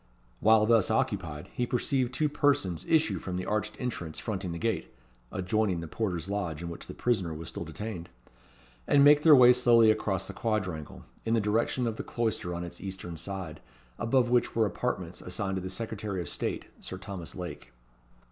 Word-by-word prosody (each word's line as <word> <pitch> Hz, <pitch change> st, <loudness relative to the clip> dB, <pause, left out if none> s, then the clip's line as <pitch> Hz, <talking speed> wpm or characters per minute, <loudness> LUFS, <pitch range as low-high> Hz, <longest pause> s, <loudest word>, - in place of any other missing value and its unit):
While 110 Hz, -1 st, +5 dB
thus 115 Hz, -1 st, +4 dB
occupied, 100 Hz, -, -1 dB
he 120 Hz, -, -1 dB
perceived 130 Hz, 0 st, 0 dB
two 150 Hz, +4 st, +1 dB
persons 140 Hz, -, +1 dB
issue 155 Hz, -, +2 dB
from 90 Hz, +1 st, -5 dB
the 90 Hz, -, -3 dB
arched 105 Hz, -2 st, -2 dB
entrance 90 Hz, -11 st, -4 dB
fronting 95 Hz, -5 st, -3 dB
the 85 Hz, -, -4 dB
gate 115 Hz, +6 st, -2 dB, 0.4 s
(adjoining 95 Hz, 0 st, 0 dB
the 85 Hz, -, -6 dB
porter's 90 Hz, -3 st, -2 dB
lodge, 90 Hz, -6 st, -3 dB
in 85 Hz, -, -4 dB
which 85 Hz, -, -7 dB
the -, -, -8 dB
prisoner 95 Hz, -10 st, 0 dB
was 80 Hz, +1 st, -7 dB
still 85 Hz, -, -6 dB
detained), 85 Hz, +1 st, -6 dB, 0.8 s
and 140 Hz, -1 st, +6 dB
make 145 Hz, +1 st, +7 dB
their 155 Hz, -1 st, +8 dB
way 125 Hz, -1 st, +8 dB
slowly 120 Hz, -3 st, +6 dB
across 95 Hz, -3 st, -1 dB
the 100 Hz, -, -7 dB
quadrangle, 95 Hz, -8 st, -3 dB, 0.2 s
in 115 Hz, +1 st, +1 dB
the -, -, +3 dB
direction 110 Hz, +4 st, +1 dB
of 115 Hz, -1 st, -2 dB
the -, -, -4 dB
cloister 110 Hz, -7 st, -2 dB
on 85 Hz, -, -4 dB
its 85 Hz, -, -8 dB
eastern 95 Hz, -3 st, -6 dB
side, 90 Hz, -1 st, -6 dB, 0.4 s
above 120 Hz, +1 st, +2 dB
which 125 Hz, -1 st, +2 dB
were 115 Hz, -1 st, +4 dB
apartments 100 Hz, -, -3 dB
assigned 95 Hz, -1 st, -2 dB
to -, -, -2 dB
the 95 Hz, -, -5 dB
Secretary 105 Hz, -1 st, -4 dB
of 85 Hz, -, -4 dB
State, -, -, -2 dB
Sir -, -, -6 dB
Thomas 95 Hz, -4 st, -7 dB
Lake. 90 Hz, -5 st, -7 dB
105 Hz, 185 wpm, -29 LUFS, 90-115 Hz, 0.8 s, their